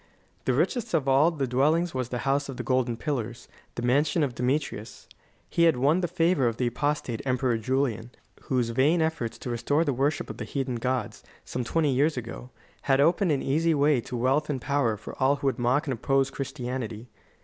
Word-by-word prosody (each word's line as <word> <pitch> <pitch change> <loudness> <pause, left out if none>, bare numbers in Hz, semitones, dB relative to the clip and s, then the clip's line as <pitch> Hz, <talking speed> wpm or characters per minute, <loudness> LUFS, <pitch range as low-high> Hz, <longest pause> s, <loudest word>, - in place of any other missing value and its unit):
The - - +2
richest 235 -7 0
of 145 -4 0
all 135 +4 +5
the 150 -5 -2
dwellings 150 +7 +2
was 130 -2 -2
the 125 - -3
House 140 +1 +1
of 130 - -6
the - - -4
Golden 130 -3 0
Pillars, 120 -5 -4 0.3
the 120 - -4
mansion 145 +6 +2
of 135 -4 -1
Demetrius. 125 -3 -3 0.4
He 170 - +2
had 165 -5 +4
won 145 +8 +3
the 175 - 0
favor 165 -5 +2
of 115 -1 -2
the 125 - 0
apostate 125 -2 -1
Emperor 130 -2 +1
Julian, 120 -1 -1 0.4
whose 125 -3 0
vain 145 +8 +3
efforts 160 -8 -2
to 125 - -5
restore 145 +7 +1
the 140 - +1
worship 140 +5 0
of - - -10
the - - -5
heathen 130 -3 -3
gods, 125 +2 -2 0.2
some 125 - -3
twenty 150 +4 +1
years 145 +3 +2
ago, 120 +1 -6 0.4
had 135 0 +4
opened 170 +4 +3
an 140 - 0
easy 160 +4 +2
way 145 -3 +3
to 125 - -6
wealth 135 +6 +1
and 140 -3 -1
power 125 -5 0
for 105 - -9
all 135 +2 +4
who 140 - -7
would 135 -1 +1
mock 125 +6 +2
and 135 - -1
oppose 135 +3 +1
Christianity. 125 -4 -5
135 Hz, 205 wpm, -27 LUFS, 125-150 Hz, 0.4 s, all